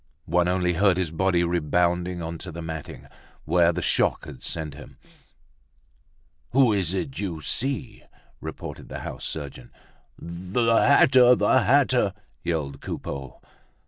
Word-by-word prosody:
One 90 +1 +2
only 90 -1 +1
heard 95 +1 +3
his 90 -4 -1
body 90 +1 +1
rebounding 85 +1 0
onto 85 +2 -6
the 85 0 -7
matting, 80 -2 -7 0.4
where 85 +1 +4
the 90 0 -4
shock - - +1
had - - -10
sent 80 -3 -4
him. 75 - -13 1.6
"Who 130 -4 +5
is 95 -2 0
it 130 +8 -4
you 90 -6 -3
see?" 120 - -3 0.4
repeated - - -8
the - - -6
house - - -6
surgeon. 70 -5 -6 0.5
"The 95 +7 -1
hatter! 130 -2 +6
The - - +3
hatter!" - - +3 0.3
yelled 75 -5 -3
Coupeau. 70 -2 -6
90 Hz, 130 wpm, -25 LUFS, 80-95 Hz, 1.6 s, hatter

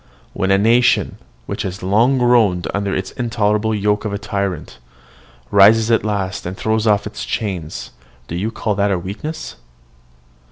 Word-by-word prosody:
When 95 - -1
a 95 - +5
nation, 115 +4 +3 0.3
which - - -4
has 95 0 -5
long 115 +8 +3
groaned 115 -8 +3
under 100 -1 -1
the 95 - -7
intolerable 110 -2 0
yoke 105 0 0
of 105 - -3
a 100 - -2
tyrant, 100 - -4 0.7
rises 110 +3 +6
at 115 - +3
last 100 -3 -2
and 90 +2 -6
throws 110 0 0
off 105 -1 +3
its 105 - -6
chains, 90 -8 -4 0.4
do 85 - -5
you 100 +6 -1
call 110 -1 -2
that 100 -3 0
weakness? 150 +12 -6
105 Hz, 155 wpm, -19 LUFS, 95-110 Hz, 0.7 s, rises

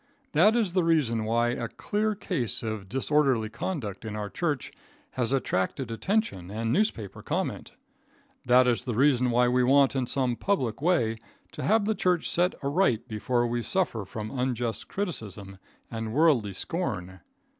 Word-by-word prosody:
That 195 +9 +5
is 215 -7 +1
the 185 -2 +2
reason 135 -10 +2
why 120 +2 +2
a 120 -1 -2
clear 215 - -1
case 120 - -2
of 110 -4 -4
disorderly 135 -3 +1
conduct 110 - -4
in 110 -1 -5
our 105 -1 -4
church 150 -7 -2 0.4
has 125 -2 -1
attracted 125 -1 -1
attention 115 - -1
and 115 +3 -2
newspaper 165 - -1
comment. - - -3 0.7
That 125 +1 +5
is 120 -2 +1
the 120 -4 -2
reason 130 -1 +3
why 120 +1 +3
we 125 +1 +3
want 140 +1 +4
in 130 -2 0
some 130 -2 0
public 135 - -1
way 150 -10 +2 0.3
to - - -7
have 215 0 +2
the 220 - +2
church 180 -5 +1
set 180 +2 +2
right 140 - +1
before 120 +3 0
we 120 0 -1
suffer 145 - -1
from 105 +2 -6
unjust 120 -4 -2
criticism 105 - -5 0.3
and 115 -1 -4
worldly 135 -9 +3
scorn. 95 - -4
125 Hz, 155 wpm, -27 LUFS, 110-165 Hz, 0.7 s, That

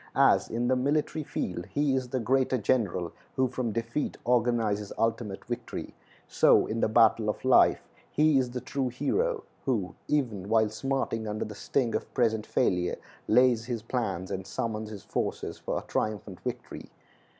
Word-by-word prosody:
As - - +4
in 120 +2 -1
the 130 - +3
military 150 +4 0
field 90 -9 -4
he 145 -1 +1
is 130 -1 -1
the 130 - -1
greater 130 +2 +2
general 100 -7 0 0.2
who 130 0 +3
from 125 -2 -2
defeat 115 +6 -2
organizes 115 -4 +1
ultimate 115 -3 -1
victory, 120 0 -5 0.3
so - - +5
in 115 - -3
the - - +3
battle 115 -1 +4
of 105 - -3
life 130 - +5 0.2
he 150 -2 +4
is 125 -1 0
the 125 0 -5
true 135 -2 -2
hero 435 - 0 0.2
who, 110 -9 0
even 115 -10 -1
while 110 -1 +4
smarting 115 -1 -2
under 105 0 -2
the 105 - -7
sting 120 +3 -1
of - - -3
present 110 -4 +1
failure, 90 -1 +1 0.3
lays 120 0 +4
his 120 -3 -3
plans 100 -7 -2
and 95 0 -4
summons 110 +1 -3
his 105 -2 -8
forces - - -3
for - - -2
a - - -4
triumphant 105 -3 -3
victory. 125 -1 -6
115 Hz, 165 wpm, -28 LUFS, 105-130 Hz, 0.3 s, so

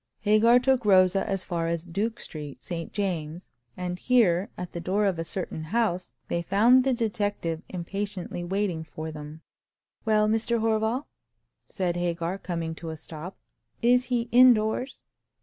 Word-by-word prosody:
Hagar 215 +3 +5
took 260 0 +2
Rosa 190 -1 +4
as 195 -2 -1
far 170 -3 -2
as 170 0 -2
Duke 205 +7 -2
Street, 150 -3 -8
St 165 -2 -5
James's, 175 -4 -3 0.3
and 180 0 -4
here, 205 -7 +3
at 180 -1 -6
the 170 - -5
door 190 +5 0
of 185 -4 0
a - - -1
certain 165 -2 -5
house, 185 -2 0 0.2
they 170 - -1
found 225 +9 +5
the 265 - +2
detective 205 -8 -1
impatiently 185 0 -4
waiting 185 -2 -1
for 160 0 -7
them. 150 +1 -9 0.6
"Well, 215 -1 +3
Mr. 225 +2 +1
Horval," 225 +4 0 0.6
said 175 -2 -2
Hagar, 175 +1 -2
coming 165 -3 -3
to 165 - -7
a 160 - -5
stop, 160 +3 -8 0.5
"is 250 +1 +4
he 245 -2 0
indoors?" 245 0 +4
190 Hz, 150 wpm, -27 LUFS, 170-220 Hz, 0.6 s, Hagar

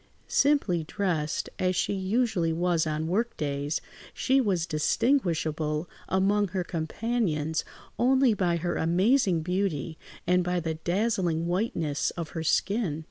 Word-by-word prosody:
Simply 270 - +2
dressed, 165 -3 -1
as 185 0 +1
she 190 - 0
usually 195 -3 0
was 170 -1 +1
on 155 0 -1
work 220 +7 -1
days, 145 0 -2 0.3
she 265 +1 +3
was 185 -8 0
distinguishable 160 - 0 0.2
among 200 +2 +2
her 185 0 -2
companions 160 -2 -1 0.4
only 260 0 +4
by 180 -4 +1
her 175 +1 -2
amazing 185 - +2
beauty 175 -4 -2 0.3
and 180 0 +3
by 180 0 0
the 165 -1 -2
dazzling 175 -1 0
whiteness 170 -5 -1
of 165 -2 -4
her 165 - -5
skin. 170 0 0
180 Hz, 130 wpm, -27 LUFS, 160-205 Hz, 0.4 s, only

